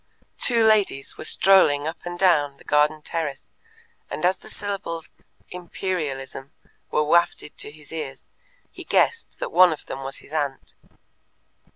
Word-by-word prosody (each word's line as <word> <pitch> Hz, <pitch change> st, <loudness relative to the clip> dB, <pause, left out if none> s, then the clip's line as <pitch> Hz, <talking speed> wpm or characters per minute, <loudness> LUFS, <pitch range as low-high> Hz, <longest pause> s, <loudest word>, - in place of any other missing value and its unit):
Two 235 Hz, -3 st, +3 dB
ladies 205 Hz, -11 st, +2 dB
were -, -, -8 dB
strolling 155 Hz, -6 st, +4 dB
up 160 Hz, +2 st, -4 dB
and 175 Hz, 0 st, -5 dB
down 150 Hz, -7 st, +3 dB
the -, -, -18 dB
garden 150 Hz, +1 st, +2 dB
terrace, 155 Hz, -5 st, -4 dB, 0.6 s
and 155 Hz, -, -3 dB
as 185 Hz, +1 st, +2 dB
the -, -, -14 dB
syllables 195 Hz, -5 st, -5 dB, 0.4 s
"Imperialism" 155 Hz, -7 st, -4 dB, 0.4 s
were 150 Hz, -, +2 dB
wafted 170 Hz, -1 st, +1 dB
to -, -, -3 dB
his 150 Hz, 0 st, -16 dB
ears, 150 Hz, -5 st, -6 dB, 0.4 s
he -, -, -10 dB
guessed 460 Hz, -1 st, +1 dB
that -, -, -4 dB
one 185 Hz, -, +7 dB
of 155 Hz, -, -6 dB
them 135 Hz, -, -6 dB
was 135 Hz, 0 st, -6 dB
his 150 Hz, -, -15 dB
aunt. 145 Hz, -4 st, -3 dB
155 Hz, 150 wpm, -24 LUFS, 145-185 Hz, 0.6 s, one